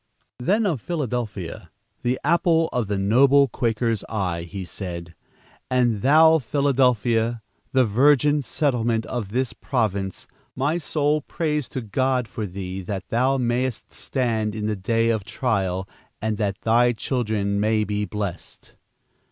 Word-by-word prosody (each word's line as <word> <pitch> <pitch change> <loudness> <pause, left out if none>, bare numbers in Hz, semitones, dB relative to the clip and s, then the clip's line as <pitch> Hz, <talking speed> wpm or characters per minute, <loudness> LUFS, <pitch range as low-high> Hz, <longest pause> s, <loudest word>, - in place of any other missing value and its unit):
Then 205 - +2
of 160 - 0
Philadelphia, 120 - -4 0.3
the 125 +1 0
apple 165 -1 +3
of 120 -4 0
the 100 0 -1
noble 135 +8 +5
Quaker's 115 -2 -1
eye, 90 -6 -2
he 95 -1 -5
said, 85 -2 -7 0.6
"And 120 -5 +2
thou, 160 +5 +6
Philadelphia, 120 -4 +1 0.3
the 130 -1 +4
virgin 145 +6 +4
settlement 120 -4 0
of 120 -6 -4
this 125 +3 -1
province, 100 -7 -2 0.3
my 145 +6 0
soul 150 -1 0
prays 150 -2 -2
to 130 - -4
God 125 +3 0
for 110 -2 -5
thee, 95 0 -5
that 95 +1 -5
thou 130 +4 +2
mayest 125 -1 -1
stand 110 -5 -1
in 105 -1 -3
the 110 0 0
day 115 +4 +1
of 110 -3 -1
trial, 100 -4 -1 0.3
and 110 -1 -2
that 100 -2 -1
thy 120 +2 +3
children 110 -5 -1
may 110 +1 +2
be 105 0 -2
blessed." 105 -4 -6
115 Hz, 135 wpm, -23 LUFS, 105-130 Hz, 0.6 s, thou